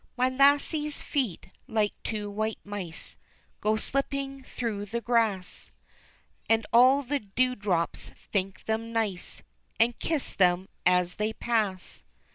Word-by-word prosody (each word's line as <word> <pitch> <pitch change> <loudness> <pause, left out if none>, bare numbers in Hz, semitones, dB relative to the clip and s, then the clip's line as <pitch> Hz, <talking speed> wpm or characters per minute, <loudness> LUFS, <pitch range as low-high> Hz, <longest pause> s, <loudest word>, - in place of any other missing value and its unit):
My 255 +1 +3
lassie's 285 +3 +3
feet 255 - -2 0.2
like 215 -2 +1
two 210 -2 -3
white 215 +2 -2
mice 195 -5 -6 0.4
Go 215 +1 +2
slipping 275 +3 -2
through 225 -5 -4
the 235 +4 -2
grass, 225 -5 0 0.8
And 225 0 +3
all 260 +4 +7
the 285 +2 -1
dew 250 +5 +1
drops 190 -7 -1 0.2
think 195 -1 -1
them 225 +1 -1
nice, 215 -6 -2 0.4
And 230 +1 +3
kiss 315 -4 -1
them 180 0 +3 0.2
as 180 0 +3
they 215 +1 0
pass. 215 -6 -1
220 Hz, 125 wpm, -28 LUFS, 200-255 Hz, 0.8 s, all